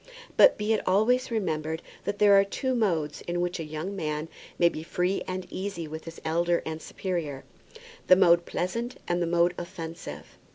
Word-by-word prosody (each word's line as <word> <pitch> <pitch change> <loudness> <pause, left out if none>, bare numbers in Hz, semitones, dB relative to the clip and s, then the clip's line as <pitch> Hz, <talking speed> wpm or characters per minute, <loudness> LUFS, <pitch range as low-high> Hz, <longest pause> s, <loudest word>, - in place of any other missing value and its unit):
But - - +7
be 210 +1 +1
it 215 - +1
always 220 +8 +3
remembered 160 -7 -2 0.2
that 205 - -2
there 205 -1 +6
are 195 0 +7
two 260 +6 -2
modes 165 -11 0
in 175 0 -1
which 175 0 -1
a - - -2
young 155 +6 -5
man 155 -3 -3 0.3
may 170 - +5
be 155 - -3
free 180 +3 -1
and 185 0 -3
easy 190 -4 -4
with 160 +1 -7
his 165 0 -9
elder 170 +2 +1
and 160 0 -4
superior, 160 -9 -4 0.6
the 185 - +9
mode 170 -2 +5
pleasant 230 +8 -3
and 175 0 0
the 170 - +1
mode 175 +1 +3
offensive. 170 -2 -8
175 Hz, 180 wpm, -27 LUFS, 160-195 Hz, 0.6 s, the